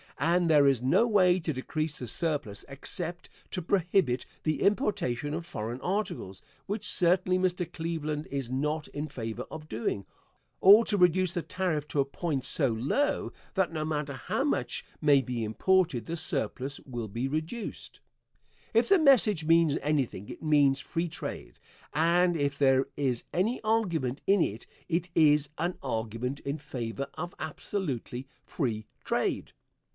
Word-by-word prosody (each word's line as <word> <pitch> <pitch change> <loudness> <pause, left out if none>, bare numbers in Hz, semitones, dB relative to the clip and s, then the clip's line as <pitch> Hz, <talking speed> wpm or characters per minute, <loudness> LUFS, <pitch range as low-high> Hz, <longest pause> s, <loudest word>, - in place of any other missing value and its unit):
And 170 0 +2
there 145 -2 +6
is 135 -4 +3
no 180 - +4
way 185 -4 +4
to 160 -2 -2
decrease 155 +4 -3
the 125 - -5
surplus 145 - -1
except 170 +5 -5 0.2
to 180 - -2
prohibit 175 -7 +1 0.2
the 155 -1 0
importation 195 - 0
of 165 +1 -4
foreign 115 -2 -5
articles, 180 - -3 0.3
which 205 +2 -2
certainly 185 +1 +3
Mr. 180 -2 -1
Cleveland 160 -3 -3
is 135 -3 -3
not 150 +4 -1
in 145 +1 -4
favor 120 -4 -5
of 155 -1 -8
doing, 110 -3 -2 0.5
or 210 +4 +8
to 205 - 0
reduce 180 -1 +4
the 175 - -1
tariff 170 -5 -2
to 145 - -1
a 135 - +4
point 140 -2 -3
so 140 0 +3
low 135 - 0 0.2
that 190 -3 +2
no 155 -1 -2
matter 150 -2 -2
how 130 - -2
much - - -1 0.2
may 145 -2 +5
be 120 -2 -3
imported 150 - +1
the 165 - -3
surplus 145 -5 -2
will 120 -4 -5
be 115 +6 -3
reduced. 160 - -5 0.7
If 230 +7 +3
the 395 -2 +6
message 230 - +4
means 165 -2 +4
anything 135 -9 -1
it - - -9
means 145 -3 +4
free 165 +4 -3
trade, - - -7 0.3
and 170 +3 +3
if 140 -2 -1
there 135 -1 +4
is 130 -4 -1
any 215 +8 0
argument 170 - 0
in 195 -1 +5
it 110 -5 -2 0.2
it 175 +1 0
is 150 -2 +4
an 175 +2 -1
argument 115 +2 -3
in 140 +2 -3
favor 135 -3 -4
of 175 - -6
absolutely 140 - -4 0.2
free 110 -8 -2 0.2
trade. - - -1
155 Hz, 155 wpm, -29 LUFS, 135-180 Hz, 0.7 s, or